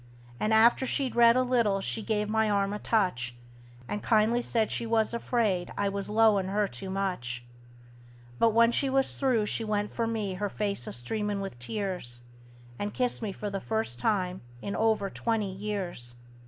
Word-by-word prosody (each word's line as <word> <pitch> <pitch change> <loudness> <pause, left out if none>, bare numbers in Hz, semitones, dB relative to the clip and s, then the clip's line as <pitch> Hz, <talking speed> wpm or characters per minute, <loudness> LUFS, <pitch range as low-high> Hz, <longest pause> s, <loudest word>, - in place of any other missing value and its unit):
And 215 - 0
after 230 +4 +5
she'd 265 -1 -1
read 235 0 +7
a 255 - +3
little 235 -6 +2
she 210 +3 -2
give 210 -1 -1
my 220 0 +2
arm 200 -1 +1
a 210 - -4
touch, 155 - 0 0.5
And 205 - -3
kindly 225 +2 +3
said 225 -2 0
she 235 - -2
was 225 0 +2
afraid 220 -6 0
I 200 - +1
was 200 0 -4
'lowin' 210 -3 +4
her 205 +1 +1
too 190 0 -7
much; 180 -12 -3 0.9
But 230 - +5
when 230 +1 +5
she 270 +3 +1
was 270 0 +1
through 250 -6 +2
she 225 - -2
went 210 -1 -1
for 230 -1 -1
me, 215 -4 -2
her 205 +2 -2
face 200 - -2
a - - -4
streamin' 205 - -2
with 195 -11 -6
tears, 175 - -2 0.6
And 205 0 -3
kissed 250 -1 +1
me 215 -3 -2
for 205 +1 -5
the 195 -1 -3
first 220 - -2
time 185 - 0 0.2
in 200 - -4
over 220 -2 +2
twenty 220 -4 -1
years! 190 - -4
210 Hz, 180 wpm, -29 LUFS, 195-225 Hz, 0.9 s, read